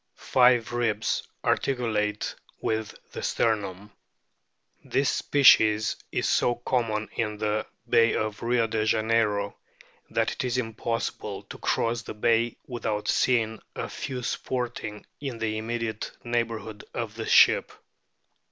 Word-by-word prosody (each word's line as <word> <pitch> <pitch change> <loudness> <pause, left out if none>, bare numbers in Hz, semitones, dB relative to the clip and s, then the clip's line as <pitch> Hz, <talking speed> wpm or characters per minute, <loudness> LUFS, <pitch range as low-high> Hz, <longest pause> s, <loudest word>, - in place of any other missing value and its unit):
Five 125 -2 +3
ribs 115 -2 0 0.2
articulate 110 -5 0 0.3
with 110 -1 -2 0.2
the - - -6
sternum. 105 -3 -1 0.9
This 135 -1 +1
species 110 -6 +5 0.2
is - - 0
so 120 - +2
common 115 -3 -1
in 105 -2 -2
the 105 0 -1 0.2
bay 115 0 +4
of 110 -1 -2
Rio 120 0 +2
de 110 -1 -1
Janeiro 110 -1 +1 0.5
that - - +1
it - - -3
is 125 0 0
impossible 115 -1 -3
to - - -11
cross 115 0 0
the - - -8
bay 115 +1 +2
without 110 -4 -3
seeing 110 -3 +2
a - - -3
few 130 -3 -5
sporting 120 -4 -3
in 135 -5 -4
the 110 -1 -1
immediate 115 -1 -3
neighbourhood 115 -3 -2
of 115 -3 -3
the 110 0 -5
ship. - - +6
115 Hz, 125 wpm, -27 LUFS, 110-120 Hz, 0.9 s, ship